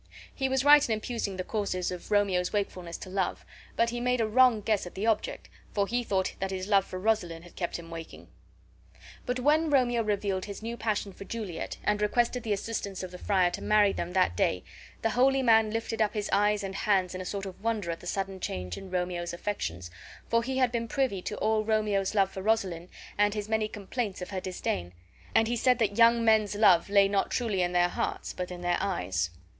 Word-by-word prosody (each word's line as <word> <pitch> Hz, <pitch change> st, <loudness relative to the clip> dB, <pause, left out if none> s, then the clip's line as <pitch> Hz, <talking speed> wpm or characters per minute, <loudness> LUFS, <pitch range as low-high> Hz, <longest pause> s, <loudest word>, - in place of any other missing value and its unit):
He 265 Hz, -1 st, -1 dB
was 265 Hz, +1 st, +1 dB
right 295 Hz, 0 st, +8 dB
in -, -, +2 dB
imputing 215 Hz, -3 st, -4 dB
the 185 Hz, -, -2 dB
cause 185 Hz, -4 st, -2 dB
of 180 Hz, -1 st, -7 dB
Romeo's 200 Hz, -4 st, +2 dB
wakefulness 185 Hz, -5 st, -3 dB
to -, -, -9 dB
love, 190 Hz, -1 st, -2 dB, 0.3 s
but 235 Hz, 0 st, +2 dB
he 240 Hz, -, -3 dB
made 250 Hz, 0 st, +1 dB
a 225 Hz, -, +2 dB
wrong 240 Hz, 0 st, +4 dB
guess 205 Hz, -3 st, 0 dB
at -, -, -11 dB
the 195 Hz, +3 st, -2 dB
object, 225 Hz, -2 st, -1 dB, 0.3 s
for 200 Hz, -1 st, +2 dB
he 240 Hz, +4 st, -1 dB
thought 190 Hz, -4 st, 0 dB
that 195 Hz, -, -2 dB
his 190 Hz, 0 st, -4 dB
love 200 Hz, -2 st, +4 dB
for 185 Hz, -, -7 dB
Rosaline 185 Hz, -5 st, 0 dB
had 175 Hz, -, -15 dB
kept 175 Hz, -, -3 dB
him 170 Hz, -1 st, -11 dB
waking. 165 Hz, -1 st, -9 dB, 1.0 s
But 250 Hz, +1 st, -1 dB
when 305 Hz, +4 st, +3 dB
Romeo 245 Hz, -4 st, +3 dB
revealed 200 Hz, -3 st, -1 dB
his 200 Hz, +1 st, -8 dB
new 230 Hz, +1 st, -3 dB
passion 210 Hz, -3 st, -2 dB
for -, -, -10 dB
Juliet, 195 Hz, -5 st, -5 dB
and 210 Hz, 0 st, +1 dB
requested 240 Hz, +3 st, +1 dB
the 220 Hz, -, -4 dB
assistance 200 Hz, -2 st, -3 dB
of 185 Hz, -, -6 dB
the 180 Hz, -, -9 dB
friar 185 Hz, -3 st, +2 dB
to -, -, -5 dB
marry 210 Hz, -2 st, +4 dB
them 170 Hz, +1 st, -4 dB
that 185 Hz, -, +2 dB
day, 90 Hz, 0 st, +1 dB, 0.4 s
the 225 Hz, -, +2 dB
holy 265 Hz, +3 st, +3 dB
man 225 Hz, -2 st, +5 dB
lifted 225 Hz, 0 st, -2 dB
up 215 Hz, +1 st, +1 dB
his 210 Hz, -1 st, -2 dB
eyes 205 Hz, +1 st, +3 dB
and 195 Hz, 0 st, -4 dB
hands 195 Hz, -3 st, +1 dB
in 185 Hz, -, -5 dB
a -, -, -4 dB
sort 200 Hz, +1 st, -4 dB
of 190 Hz, +1 st, -9 dB
wonder 215 Hz, -6 st, -1 dB
at 165 Hz, -, -5 dB
the 175 Hz, -, -10 dB
sudden 195 Hz, 0 st, -3 dB
change 90 Hz, -, -4 dB
in 195 Hz, -, -10 dB
Romeo's 180 Hz, -1 st, -2 dB
affections, 90 Hz, -, -4 dB, 0.4 s
for 230 Hz, 0 st, +2 dB
he 260 Hz, +2 st, -3 dB
had 255 Hz, -2 st, +3 dB
been 230 Hz, -1 st, -2 dB
privy 240 Hz, -6 st, 0 dB
to 210 Hz, -, -5 dB
all 215 Hz, 0 st, +1 dB
Romeo's 215 Hz, -2 st, 0 dB
love 195 Hz, -2 st, +3 dB
for 190 Hz, -, -6 dB
Rosaline 190 Hz, -5 st, 0 dB, 0.3 s
and 205 Hz, 0 st, +3 dB
his 210 Hz, -1 st, -3 dB
many 220 Hz, -1 st, +1 dB
complaints 210 Hz, 0 st, -4 dB
of 180 Hz, +1 st, -7 dB
her 190 Hz, -1 st, -3 dB
disdain; 90 Hz, -, -3 dB, 0.4 s
and 225 Hz, -, +5 dB
he 240 Hz, -, 0 dB
said 250 Hz, +1 st, +3 dB
that 210 Hz, -4 st, 0 dB
young 230 Hz, 0 st, +6 dB
men's 215 Hz, -2 st, +3 dB
love 190 Hz, -4 st, +5 dB
lay 200 Hz, -1 st, +5 dB
not 195 Hz, 0 st, 0 dB
truly 220 Hz, -6 st, 0 dB
in 175 Hz, 0 st, +1 dB
their 175 Hz, 0 st, +4 dB
hearts, -, -, -3 dB
but 180 Hz, -1 st, -4 dB
in 180 Hz, -1 st, -7 dB
their 175 Hz, 0 st, +1 dB
eyes. 95 Hz, -, -1 dB
205 Hz, 225 wpm, -28 LUFS, 185-225 Hz, 1.0 s, right